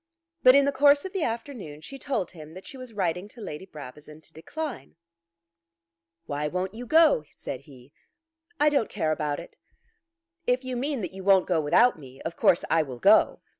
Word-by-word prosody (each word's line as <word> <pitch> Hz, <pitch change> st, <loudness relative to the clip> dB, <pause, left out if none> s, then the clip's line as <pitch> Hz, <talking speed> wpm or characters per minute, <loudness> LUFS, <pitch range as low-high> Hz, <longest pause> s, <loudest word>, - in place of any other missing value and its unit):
But 255 Hz, +1 st, +7 dB
in 280 Hz, 0 st, +5 dB
the 280 Hz, -, +2 dB
course 285 Hz, +2 st, +4 dB
of 380 Hz, -, -6 dB
the 385 Hz, -, -2 dB
afternoon 225 Hz, -, -5 dB
she 275 Hz, +10 st, -10 dB
told 255 Hz, -11 st, -2 dB
him 160 Hz, -2 st, -12 dB
that 185 Hz, -, -11 dB
she -, -, -10 dB
was 255 Hz, -2 st, -9 dB
writing 185 Hz, -2 st, -2 dB
to 235 Hz, -, -16 dB
Lady 190 Hz, -3 st, -7 dB
Brabazon 150 Hz, 0 st, -11 dB
to 160 Hz, -, -18 dB
decline. 295 Hz, -, -7 dB, 1.3 s
"Why 145 Hz, +1 st, -2 dB
won't 185 Hz, +4 st, -3 dB
you 240 Hz, +2 st, -8 dB
go?" 315 Hz, -, +5 dB
said 130 Hz, -, -7 dB
he. 130 Hz, 0 st, -16 dB, 0.7 s
"I 300 Hz, +1 st, +5 dB
don't 280 Hz, -7 st, +1 dB
care 160 Hz, -6 st, -1 dB
about 150 Hz, -2 st, -2 dB
it." -, -, -12 dB, 0.9 s
"If 250 Hz, +1 st, +1 dB
you 255 Hz, -1 st, -3 dB
mean 270 Hz, 0 st, -2 dB
that 190 Hz, -, -5 dB
you 190 Hz, 0 st, -8 dB
won't 190 Hz, -1 st, +5 dB
go 170 Hz, -4 st, +1 dB
without 165 Hz, +8 st, +4 dB
me, 135 Hz, -2 st, -13 dB
of 165 Hz, -, -5 dB
course 170 Hz, -, +3 dB
I 160 Hz, +1 st, +3 dB
will 135 Hz, -5 st, -6 dB
go." -, -, +4 dB
190 Hz, 195 wpm, -26 LUFS, 155-260 Hz, 1.3 s, But